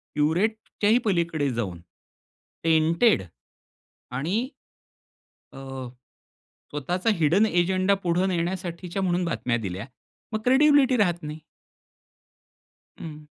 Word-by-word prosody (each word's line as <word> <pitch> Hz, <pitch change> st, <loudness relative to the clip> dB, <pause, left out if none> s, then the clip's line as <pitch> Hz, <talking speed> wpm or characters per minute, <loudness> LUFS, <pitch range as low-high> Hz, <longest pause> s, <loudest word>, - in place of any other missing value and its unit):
प्युरिटीच्याही 205 Hz, +8 st, +1 dB
पलीकडे 170 Hz, -7 st, +1 dB
जाऊन 100 Hz, -8 st, -3 dB, 0.8 s
टेंटेड 165 Hz, -, +3 dB, 0.9 s
आणि 200 Hz, -, -1 dB, 1.0 s
अ, 135 Hz, -2 st, -7 dB, 0.8 s
स्वतःचा 175 Hz, -, -1 dB
हिडन 175 Hz, +8 st, +4 dB
अजेंडा 185 Hz, +1 st, +2 dB
पुढे 175 Hz, +1 st, +1 dB
नेण्यासाठीच्या 180 Hz, 0 st, -3 dB
म्हणून 180 Hz, -1 st, +1 dB
बातम्या 125 Hz, -7 st, -1 dB
दिल्या. 100 Hz, -2 st, -5 dB, 0.5 s
मग 215 Hz, -, 0 dB
क्रेडिबिलिटी 270 Hz, -1 st, +5 dB
राहत 175 Hz, -5 st, +1 dB
नाही. 150 Hz, +1 st, -6 dB, 1.6 s
हं. 155 Hz, -2 st, -8 dB
175 Hz, 85 wpm, -25 LUFS, 150-200 Hz, 1.6 s, क्रेडिबिलिटी